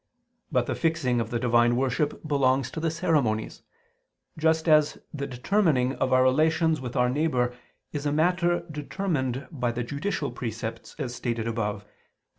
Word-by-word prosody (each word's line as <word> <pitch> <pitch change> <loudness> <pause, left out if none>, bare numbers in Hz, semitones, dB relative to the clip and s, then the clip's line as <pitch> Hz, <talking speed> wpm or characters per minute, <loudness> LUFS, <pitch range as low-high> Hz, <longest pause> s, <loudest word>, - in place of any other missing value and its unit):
But 125 -4 +2
the - - -2
fixing 155 -8 +1
of 115 - -4
the 120 - -1
divine 120 0 +3
worship 135 +4 -1
belongs 135 -3 +2
to - - -5
the 165 +1 0
ceremonies; 155 -10 0 0.7
just 160 0 +1
as 155 -1 +4 0.2
the 140 -2 -3
determining 135 -1 +1
of 130 - 0
our 130 0 +5
relations 160 +3 +3
with 125 -1 -6
our 125 -1 +3
neighbor 125 -3 +1 0.4
is 145 -1 -2
a - - +1
matter 175 +2 +2
determined 145 -4 -2
by 125 -6 -1
the 120 +1 -3
judicial 145 +3 -3
precepts, 115 -1 -6
as 130 -5 -4
stated 115 -2 -2
above 105 -3 -2
(Q. 105 - -30
135 Hz, 160 wpm, -26 LUFS, 120-160 Hz, 0.7 s, our